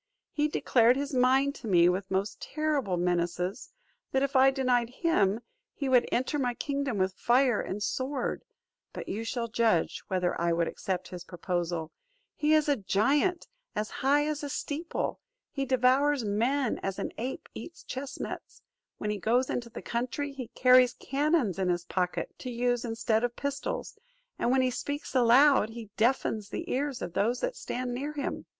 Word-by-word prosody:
He 300 0 +1
declared 245 -5 +3
his 285 +1 -3
mind 265 +2 +3
to 230 - -6
me, 175 -4 +5
with 190 +2 0
most 195 +2 -2
terrible 290 - -1
menaces, 175 +3 -1 0.4
that 265 0 +2
if 275 0 -2
I 265 +1 +7
denied 255 -3 +1
him, 235 - +1 0.3
he 280 - -3
would 250 -2 +4
enter 260 +4 0
my 245 -3 0
kingdom 280 -5 -2
with 190 0 +1
fire 245 +1 +3
and 205 +2 -4
sword; 260 +2 -2 0.5
but - - -7
you 215 +3 -3
shall 235 +1 -2
judge 220 -6 +1
whether 180 -2 -1
I 170 0 +2
would 170 0 +1
accept 185 -2 -3
his 180 -1 -7
proposal: 175 -2 -3 0.4
he 305 +1 +3
is 305 -1 +3
a 290 - +4
giant, 275 - +1 0.3
as 215 0 -2
high 285 +2 +3
as 300 -1 -2
a 290 - -3
steeple; 300 +4 -3 0.3
he 275 -2 -2
devours 260 +1 +3
men 235 +5 0
as 195 -1 -3
an - - -3
ape 255 +3 -4
eats 340 - -9
chestnuts; 265 +1 -6 0.3
when 210 - -2
he 210 - -3
goes 245 +6 +1
into 235 -1 -3
the - - -9
country, 255 +5 -2
he 265 -3 -7
carries 255 -1 +6
cannons 275 - 0
in 185 -1 +1
his 175 -1 0
pocket, 180 0 -2
to 255 - -6
use 245 0 0
instead 225 -1 0
of 240 0 -1
pistols; 280 0 -4 0.4
and - - +1
when 260 +1 +3
he 255 - +1
speaks 285 +4 -4
aloud 255 -1 +5
he 225 -2 -9
deafens 220 -3 +1
the - - -5
ears 275 0 -1
of 170 - -5
those 230 +6 +1
that - - -1
stand 250 0 -4
near 285 +5 -3
him. 285 -2 -4
245 Hz, 175 wpm, -29 LUFS, 205-275 Hz, 0.5 s, I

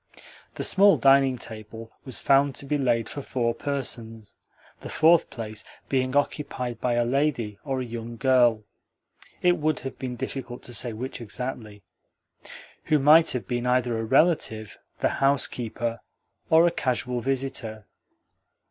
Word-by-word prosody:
The - - -4
small 200 +1 +5
dining 135 -1 +4
table 110 0 -9
was 130 -3 -3
found 140 0 +3
to - - -4
be 145 +1 -1
laid 120 -4 +1
for 145 - -6
four 120 -3 -1
persons 115 -7 -5 0.5
the - - -9
fourth 165 +1 +4
place 110 -2 -6 0.3
being 130 0 0
occupied 135 -4 -2
by 125 - +1
a 120 0 +2
lady 120 -6 -1
or 135 -3 -2
a - - -4
young 115 0 -7
girl 120 -4 +3 0.8
(it 180 0 +4
would 155 +1 0
have 135 - -7
been 125 -2 -4
difficult 125 0 -6
to 120 - -7
say 120 +2 -1
which 125 +3 -6
exactly) 110 -3 -6 1.0
who 155 - +3
might 155 +4 +6
have 125 - -3
been 120 0 -2
either 125 -1 +1
a 110 - -2
relative, 115 - +1 0.3
the - - +3
housekeeper, 120 -4 0 0.5
or 160 +1 +6
a 175 - +3
casual 125 -3 -2
visitor. 125 -5 -3
125 Hz, 150 wpm, -25 LUFS, 115-140 Hz, 1.0 s, might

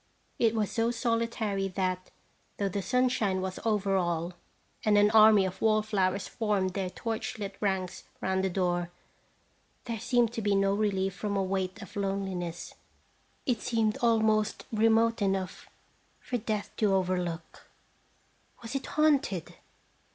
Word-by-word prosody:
It 230 -1 +3
was 215 -2 0
so 230 0 +1
solitary 230 -4 -1
that, 185 -1 -2 0.5
though 200 -1 0
the 200 +2 -2
sunshine 215 -2 +1
was 185 0 -4
over 205 -3 +1
all, 175 -1 -1 0.5
and 210 -1 +4
an 205 0 +5
army 215 -2 +7
of 190 0 -5
wall 215 -1 +3
flowers 195 -2 0
formed 205 -5 0
their 190 -2 -2
torch 225 +4 -4
lit 200 -2 -5
ranks 190 -3 -2
round 190 0 0
the 190 - +1
door, 175 -1 0 0.9
there 230 -2 -4
seemed 240 -1 +2
to 230 - -3
be 205 -1 +2
no 195 0 +3
relief 195 -2 0
from 200 +1 -2
a 195 - +1
weight 190 +2 -2
of - - -13
loneliness. 195 -4 -3 0.7
It 245 -4 0
seemed 225 -2 0
almost 220 -2 +2
remote 225 +1 +3
enough 195 -2 -2 0.5
for 245 - -3
Death 215 -2 -3
to 205 -3 +3
overlook. 180 -3 -2 1.0
Was 230 +2 -6
it 275 - -3
haunted? 285 - +1
200 Hz, 145 wpm, -29 LUFS, 190-225 Hz, 1.0 s, army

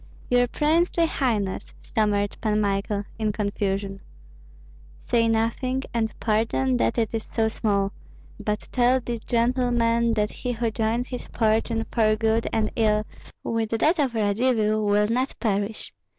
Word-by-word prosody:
"Your 245 0 +4
princely 330 +5 +2
highness!" 220 -11 -2
stammered 205 -2 0
Pan 215 -1 +1
Michael, 200 0 0 0.2
in 215 -1 +1
confusion. 200 -1 -2 1.0
"Say 230 -1 +2
nothing, 230 +4 0
and 225 -2 0
pardon 135 - +1
that 115 -1 +1
it 225 -1 0
is 225 -1 -3
so 225 -1 +1
small; 200 -3 0 0.5
but 210 0 -3
tell 250 +1 +3
these 235 -1 -4
gentlemen 235 -1 +2
that 210 -1 0
he 250 - -4
who 230 -1 -1
joins 225 +3 -1
his 250 - -6
fortune 225 0 0
for 215 -2 +3
good 225 +1 +1
and 220 -1 0
ill 215 -2 +2 0.4
with 225 -1 -1
that 315 +8 +2
of 265 -5 +1
Radzivill 215 0 +1
will 210 0 +3
not 250 +4 -1
perish. 205 -1 -2
225 Hz, 140 wpm, -25 LUFS, 210-240 Hz, 1.0 s, Your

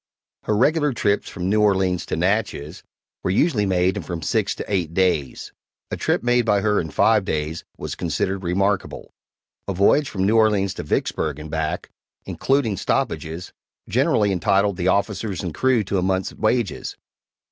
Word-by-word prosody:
Her 105 - +1
regular 150 +3 +2
trips 105 -3 0
from 90 -2 -4
New 105 +2 +2
Orleans 95 -4 +2
to - - -1
Natchez 90 -4 -1 0.4
were - - -2
usually 105 - +2
made 90 0 +1
in - - -2
from 85 -3 -6
six 100 +1 0
to - - -6
eight 90 -5 -1
days; 90 -8 0 0.4
a - - -1
trip - - 0
made 120 0 +3
by 105 -3 +2
her 105 0 +2
in 80 - -6
five 110 +5 +3
days 80 -1 -3
was - - -5
considered 90 +3 -2
remarkable. 95 +2 -1 0.5
A 100 - -2
voyage 135 +10 +3
from 95 -2 -1
New 110 +3 +3
Orleans 105 -3 +3
to - - -5
Vicksburg 75 -3 -1
and 75 0 -8
back, 80 -1 -3 0.3
including 135 -7 0
stoppages, 80 +2 -2 0.3
generally 105 -1 +2
entitled 95 +1 +1
the 90 -1 -1
officers 100 0 0
and 90 -4 -4
crew 130 0 +2
to 100 0 -1
a - - 0
month's 95 +1 -1
wages. 110 -2 -1
95 Hz, 170 wpm, -22 LUFS, 90-105 Hz, 0.5 s, made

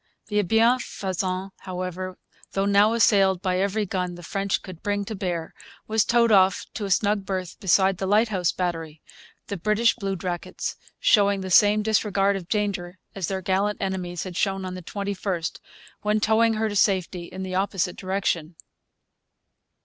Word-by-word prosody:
The 210 0 +2
Bienfaisant, 195 -4 0
however, 185 0 -5 0.4
though 195 0 +1
now 200 +2 +4
assailed 195 -5 +4
by 185 -1 +1
every 200 +2 0
gun 180 -2 -3
the 175 - -11
French 195 +3 -1
could 185 -3 -10
bring 205 0 -1
to 220 - -5
bear, 175 -5 -3 0.3
was 220 0 +3
towed 235 -1 +3
off 190 -2 +4
to 210 - -4
a - - -4
snug 205 +2 +2
berth 185 -2 -4
beside 190 0 +3
the 190 - -2
Lighthouse 205 -5 +2
Battery, 165 -4 -4 0.4
the 200 - -5
British 215 +6 +2
bluejackets 190 -5 -4 0.2
showing 200 -2 +4
the 190 0 -5
same 210 +3 +5
disregard 200 -2 +2
of 180 -3 -6
danger 190 -4 -2 0.2
as 190 -4 -3
their 190 -1 -3
gallant 195 +3 0
enemies 185 -3 -3
had 185 -2 -7
shown 195 0 0
on 185 - -5
the 185 - -7
21st, 195 -2 -3 0.4
when 210 +1 +1
towing 225 +1 +3
her 220 +1 0
to 205 - -4
safety 185 -3 +1
in 185 +2 -7
the 185 -1 -5
opposite 185 -2 0
direction. 185 -4 -2
195 Hz, 160 wpm, -25 LUFS, 185-205 Hz, 0.4 s, same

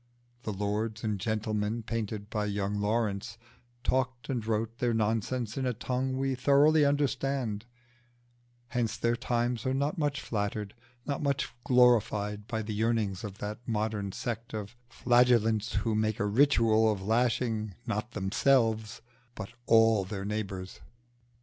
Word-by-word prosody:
The 110 - -4
lords 105 +2 -2
and 105 -3 -1
gentlemen 110 +1 -1
painted 110 -2 -3
by 105 -1 -1
young 100 0 -1
Lawrence 105 -1 -1 0.5
talked 130 0 -1
and 125 -4 -1
wrote 115 +1 -2
their 120 -2 +1
nonsense 115 +2 -1
in 130 -1 0
a 125 - 0
tongue 130 +2 -2
we 135 0 0
thoroughly 145 +4 +4
understand; 135 -6 0 1.0
hence 120 -2 -1
their 120 0 +1
times 120 -1 -1
are 130 0 0
not 145 +6 -1
much 145 -3 0
flattered, 105 -1 -3 0.3
not 140 -2 -2
much 140 -2 -1
glorified 105 -4 +3
by 110 -1 -2
the 105 0 -4
yearnings 110 -3 0
of 100 -2 -6
that 105 +1 -5
modern 105 -3 -1
sect 115 +2 -4
of 105 +1 -6
Flagellants 120 -3 +3
who 115 - 0
make 110 0 0
a 105 - +1
ritual 110 -2 +4
of 95 -3 -4
lashing 110 -2 0
not 110 +4 -3
themselves 110 +2 +1 0.3
but 100 -2 -6 0.2
all 115 -2 +5
their 100 +1 -5
neighbours. 100 -3 -4
110 Hz, 140 wpm, -30 LUFS, 105-125 Hz, 1.0 s, all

